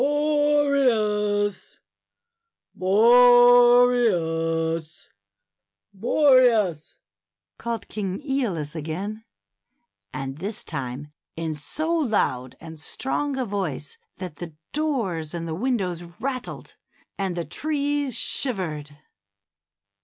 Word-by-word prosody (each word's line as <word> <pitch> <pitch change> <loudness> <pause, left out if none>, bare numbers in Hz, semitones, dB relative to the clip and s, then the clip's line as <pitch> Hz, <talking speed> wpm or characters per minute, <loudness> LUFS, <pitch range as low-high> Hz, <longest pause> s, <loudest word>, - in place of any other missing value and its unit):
Boreas, 275 -9 +1 1.0
Boreas, 225 -8 +4 0.8
Boreas!" 230 - +3 0.6
called 235 -1 -4
King 195 -3 -4
^olus 205 - -2
again, 185 +8 -5 0.9
and 135 +2 -6
this 200 +4 -3
time 140 0 -6 0.2
in 165 -1 -3
so 310 - -3
loud 210 - 0
and 160 -1 -11
strong 270 - -2
a 260 - -1
voice 185 - -4 0.2
that 180 -5 -7
the 165 -3 -8 0.2
doors 210 - -2
and 165 +1 -5
windows 195 -10 -1 0.2
rattled, 255 -1 -5 0.4
and 190 -3 -2
the 170 - -2
trees 285 - -2
shivered. 155 - -1
205 Hz, 80 wpm, -24 LUFS, 165-255 Hz, 1.0 s, Boreas